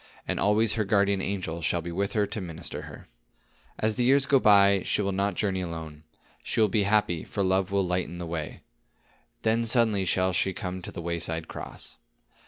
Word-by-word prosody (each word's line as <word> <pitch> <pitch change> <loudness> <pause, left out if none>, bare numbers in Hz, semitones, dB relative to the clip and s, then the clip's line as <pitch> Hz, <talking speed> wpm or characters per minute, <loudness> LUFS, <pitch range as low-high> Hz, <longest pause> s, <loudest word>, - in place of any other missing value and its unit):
And - - -1
always 105 +1 +3
her 110 0 0
guardian 100 -1 +2
angel 90 -4 -3
shall 85 +1 0
be 85 - -5
with 100 +3 -2
her 105 -2 +2
to 105 - -5
minister 85 -1 -5
to - - -9
her. - - -12 0.7
"As 110 0 0
the 125 - -1
years 135 +2 +5
go 135 0 +4
by, 100 -3 +5
she 105 - 0
will 100 - 0
not 100 +1 0
journey 95 -3 -1
alone. 80 -3 -7 0.4
She - - -3
will 110 -1 +4
be 105 0 +1
happy, 100 -6 +1
for 100 - -2
love 95 0 +1
will 100 -1 +1
lighten 90 -1 -2
the 90 - -5
way. 80 -2 -5 0.8
Then 115 +1 +2
suddenly 110 -5 +3
shall 95 +1 +1
she 95 +1 +1
come 90 0 -5
to - - -8
the 85 - -7
wayside 85 -1 -3
cross. - - -7
95 Hz, 200 wpm, -27 LUFS, 85-105 Hz, 0.8 s, years